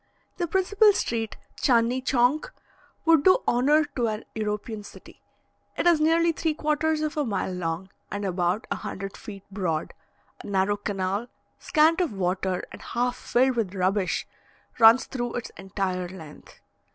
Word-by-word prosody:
The 345 - -1
principal 405 +4 +4
street, 225 - -2 0.2
Tchandni 240 0 +2
Tschank, 265 - +2 0.6
would 325 -3 +5
do 370 - +6
honour 290 +6 +4
to 240 -3 +1
an 215 0 -4
European 210 0 -3
city: 205 - -14 0.6
it - - -1
is 340 -3 +5
nearly 335 +2 +4
three 320 -1 -1
quarters 305 +1 0
of 310 +1 -2
a 300 - +2
mile 200 -6 -2
long, 180 +1 -4 0.2
and 205 0 -4
about 180 +2 0
a - - 0
hundred 195 +1 -6
feet 200 -3 -10
broad; 175 -6 -2 0.5
a - - -9
narrow 200 +1 +1
canal, 200 +2 -2 0.3
scant 325 +3 +3
of 340 -10 -1
water 185 -1 -1
and - - -10
half 245 +1 -1
filled 255 +1 +1
with 205 -5 -2
rubbish, 190 +1 0 0.5
runs 230 +2 +7
through 240 -2 -4
its 245 - -5
entire 190 -2 -3
length. 160 -5 -13
225 Hz, 150 wpm, -26 LUFS, 195-300 Hz, 0.6 s, runs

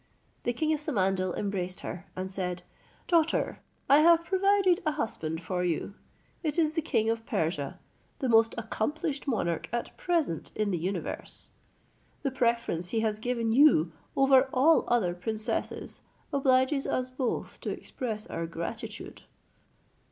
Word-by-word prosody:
The 240 - +2
king 310 +6 +1
of 305 - -1
Samandal 190 - 0
embraced 185 -3 -2
her, 175 - -6
and 185 +1 -4
said, 180 -2 -3 0.4
"Daughter, 330 -2 +2 0.3
I 280 +2 +7
have 335 +1 +6
provided 385 -1 +3
a 310 -2 +1
husband 165 - -3
for 180 +2 -1
you; 175 +3 -1 0.5
it 305 -2 -1
is 315 -2 +3
the 325 - 0
king 225 -8 +1
of 225 0 -3
Persia, 160 - -1 0.4
the 265 - -1
most 225 -1 +4
accomplished 280 +7 -2
monarch 170 - -1
at 235 0 -3
present 330 - 0
in 210 -1 0
the 175 - -1
universe. 185 +4 -4 0.7
The 275 - 0
preference 235 -9 0
he 225 +2 0
has 215 -1 0
given 235 -1 -1
you 230 - +5 0.3
over 270 -1 +5
all 295 +6 +4
other 220 -8 +2
princesses 220 +5 -3 0.3
obliges 270 0 +3
us 255 0 -1
both 255 -2 -3
to - - -3
express 220 -4 -4
our 165 - -4
gratitude." 170 +7 -6
230 Hz, 145 wpm, -29 LUFS, 185-285 Hz, 0.7 s, I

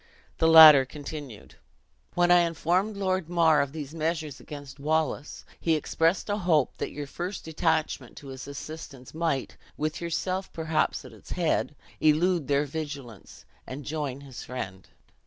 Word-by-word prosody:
The 160 - +4
latter 155 -4 +10
continued: 145 -3 -9 0.6
"When 175 0 +3
I 175 - +8
informed 175 +5 0
Lord 185 -3 -1
Mar 165 -3 +4
of 140 - -2
these 150 -1 -7
measures 160 -3 -2
against 145 -2 -10
Wallace, 155 0 -1
he 165 -1 +2
expressed 165 +3 0
a 205 0 -1
hope 165 -7 +2
that - - -3
your 145 0 -6
first 175 +7 -6
detachment 160 -5 -1
to 140 - -10
his 130 -1 -8
assistance 140 -2 -9
might, 160 -5 -2 0.2
with 155 +2 -2
yourself, 185 +3 -2
perhaps, 160 -4 -1
at 125 - -12
its 110 - -9
head, 165 -3 0 0.2
elude 160 +1 +2
their 140 +1 +2
vigilance, 140 - -8 0.2
and 135 +2 -7
join 145 -3 -4
his 135 -3 -9
friend. 95 -7 -7
155 Hz, 150 wpm, -27 LUFS, 140-165 Hz, 0.6 s, latter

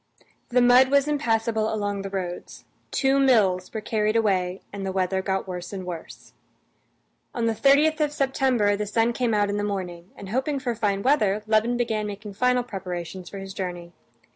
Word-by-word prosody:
The 245 0 +3
mud 250 +2 +6
was 280 +1 +3
impassable 225 -6 0
along 205 -2 -2
the 195 - -5
roads; 185 -2 -6 0.2
two 270 0 +2
mills 205 -9 +3
were 220 - -4
carried 215 0 0
away, 190 -4 +1
and 200 -1 -5
the 190 - -2
weather 190 0 0
got 190 0 -2
worse 180 -1 -6
and 190 -2 -6
worse. 170 -3 -9 1.0
On 235 - 0
the 225 - +2
30th 290 +6 +4
of 300 -1 +1
September 265 -7 +1
the 210 +1 -3
sun 225 +3 +1
came 235 -3 0
out 205 -1 +1
in 205 - -2
the 205 - -1
morning, 185 -3 -4
and 195 - -9
hoping 265 +6 -1
for 255 -3 -2
fine 205 -3 -1
weather, 215 -7 +2
Levin 220 +2 +2
began 220 -3 -1
making 205 0 -7
final 250 +3 +2
preparations 180 -4 -6
for 200 - -8
his 195 0 -7
journey. 175 -2 -5
210 Hz, 185 wpm, -25 LUFS, 190-245 Hz, 1.0 s, mud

